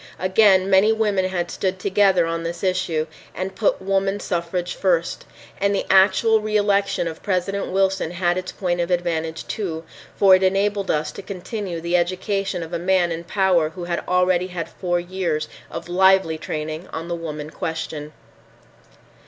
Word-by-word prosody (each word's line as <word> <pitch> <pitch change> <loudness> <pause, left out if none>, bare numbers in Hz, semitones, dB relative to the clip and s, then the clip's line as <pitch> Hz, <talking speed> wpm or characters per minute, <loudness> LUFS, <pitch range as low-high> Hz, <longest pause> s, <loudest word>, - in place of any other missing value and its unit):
Again 190 0 +4
many 195 +3 +5
women 210 -4 +1
had 180 -2 -2
stood 190 -1 -2
together 190 -2 +3
on 165 0 -2
this 170 +2 -5
issue 180 -4 0 0.3
and 185 +1 -4
put 205 +2 +1
woman 195 +1 0
suffrage 175 -1 -2
first. 175 -3 0 0.3
And 200 +1 +2
the - - -1
actual 195 +4 +5
reelection 205 -3 +1
of 160 -1 -6
President 195 +1 -1
Wilson 190 -2 +1
had 175 0 0
its 185 0 -4
point 175 -2 -1
of 170 - -2
advantage, 165 -2 -1
too, 165 -7 -4 0.3
for 195 -2 +6
it 185 - +6
enabled 195 +1 +1
us 150 0 0
to 200 - -8
continue 190 -1 -5
the 170 +2 +1
education 185 +1 -1
of 165 +1 -9
a 170 - -1
man 180 -1 +2
in 165 +1 -4
power 185 -4 +2
who 175 +2 -8
had 175 0 -2
already 180 0 +2
had 175 -3 -5
four 175 -2 -1
years 175 -3 -2 0.2
of 165 0 -7
lively 190 -2 +3
training 155 +3 -5
on 165 +1 -5
the 175 - -3
woman 155 -2 -6
question. 160 -3 -5
185 Hz, 165 wpm, -22 LUFS, 170-195 Hz, 0.3 s, for